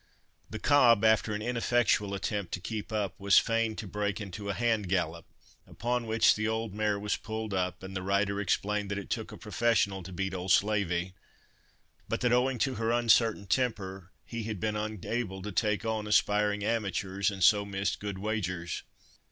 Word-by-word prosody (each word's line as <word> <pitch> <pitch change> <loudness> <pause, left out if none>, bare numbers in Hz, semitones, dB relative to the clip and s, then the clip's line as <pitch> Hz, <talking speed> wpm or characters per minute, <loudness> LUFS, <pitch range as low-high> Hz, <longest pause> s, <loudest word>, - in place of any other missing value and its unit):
The - - -5
cob, 120 -7 +5
after 110 0 +3
an 105 - -4
ineffectual 115 -4 +1
attempt 100 -1 -2
to - - -8
keep 110 +4 -5
up, 105 -4 -1
was 100 0 +4
fain 115 -1 +2
to 115 - -6
break 100 +1 -2
into 100 0 -6
a - - 0
hand 115 -5 0
gallop, 85 -3 -1 0.4
upon 120 0 -2
which 110 0 +5
the 110 +1 -1
old 110 -2 -2
mare 105 -1 0
was 105 0 -1
pulled 110 -1 -5
up, 90 0 -2
and 95 0 -7
the 95 - -2
rider 100 +1 0
explained 105 +1 0
that 100 - -2
it 100 - -7
took - - -3
a - - -9
professional 110 -4 +1
to 95 - -9
beat 95 +1 -3
old 90 0 -2
"Slavey"; 95 -3 +2 1.0
but - - -1
that 125 -1 +3
owing 125 +1 +2
to 135 +3 0
her 115 - +1
uncertain 115 -3 +3
temper, 95 -4 -2
he 115 -1 -5
had 110 -3 -4
been 105 +3 -1
unable 105 -1 -3
to 105 - -5
"take 105 +1 0
on" 110 -1 -2
aspiring 105 0 +2
amateurs, 100 -3 0
and 100 -3 -3
so 100 +4 +6
missed 100 0 -2
good 100 -2 -4
wagers. 90 -5 -3
105 Hz, 185 wpm, -30 LUFS, 95-110 Hz, 1.0 s, so